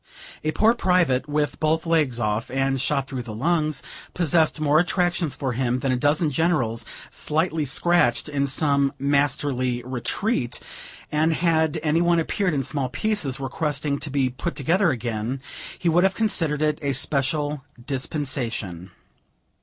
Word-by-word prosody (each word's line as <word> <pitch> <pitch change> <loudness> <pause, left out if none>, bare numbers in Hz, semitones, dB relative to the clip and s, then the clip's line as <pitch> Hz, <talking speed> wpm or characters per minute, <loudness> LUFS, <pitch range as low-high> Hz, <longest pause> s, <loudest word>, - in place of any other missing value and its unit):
A 155 - 0
poor 220 +7 +4
private, 175 - +2
with 150 0 -1
both 160 +1 +1
legs 155 -8 +1
off, 105 0 -1
and 135 0 0
shot 140 -1 0
through 130 -2 -4
the 115 -3 -7
lungs, 155 +1 0 0.3
possessed 165 -2 +2
more 155 0 +4
attractions 175 -3 0
for 130 -3 -2
him 125 0 0
than 130 +1 -1
a - - +2
dozen 150 +4 +1
generals, 130 -7 0 0.3
slightly 160 0 0
scratched 160 -2 +2
in 140 -2 -1
some 140 -1 +1
"masterly 135 -3 0
retreat;" 125 - -1 0.5
and 155 +2 +2
had 160 -2 +1
any 160 +2 +2
one 170 0 +3
appeared 180 +1 0
in 135 - 0
small 135 -1 -1
pieces, 145 -2 -1
requesting 145 +1 -2
to 150 - -4
be 135 -1 +1
put 170 +7 -4
together 170 +6 +2
again, 120 0 -2 0.4
he 175 - -3
would 170 +2 +4
have 190 0 +2
considered 165 -9 +1
it 150 0 +1
a 140 -2 0
special 145 +1 0 0.2
dispensation. 125 - -3
145 Hz, 150 wpm, -24 LUFS, 130-160 Hz, 0.5 s, poor